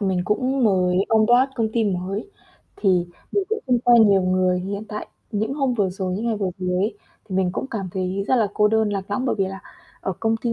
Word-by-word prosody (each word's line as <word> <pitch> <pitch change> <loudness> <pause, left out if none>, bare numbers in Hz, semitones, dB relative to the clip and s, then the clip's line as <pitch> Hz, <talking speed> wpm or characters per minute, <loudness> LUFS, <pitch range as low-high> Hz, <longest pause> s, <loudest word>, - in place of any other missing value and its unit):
mình 190 -3 0
cũng 255 +5 +1
mới 180 -3 +2
on 220 -1 +4
board 250 +3 +4
công 225 -2 0
ty 230 -1 +1
mới, 195 - -3 0.5
thì 180 -4 +2 0.3
mình 400 -2 +1
cũng 445 - -1
không 250 -2 +3
quen 235 -3 +6
nhiều 195 -1 +4
người 185 0 +2
hiện 200 +3 -4
tại. 210 - -5 0.3
Những 220 +5 -1
hôm 270 -4 0
vừa 200 -5 +1
rồi, 185 0 -3
những 220 +5 -3
ngày 225 - 0
vừa 195 -3 -1
rồi 180 -1 -1
ấy, 205 +5 0 0.3
thì 190 - -4
mình 185 -2 +1
cũng 265 - -3
cảm 200 -6 -3
thấy 190 +1 -2
rất 260 - +4
là 220 -4 +2
cô 210 -1 +4
đơn, 220 0 +2
lạc 195 -1 -4
lõng, 255 +5 -1
bởi 255 - +1
vì 195 - +2
là 195 +1 -7 0.4
ở 190 - -2
công 225 0 +1
ty 230 +1 -2
205 Hz, 245 wpm, -22 LUFS, 190-230 Hz, 0.5 s, quen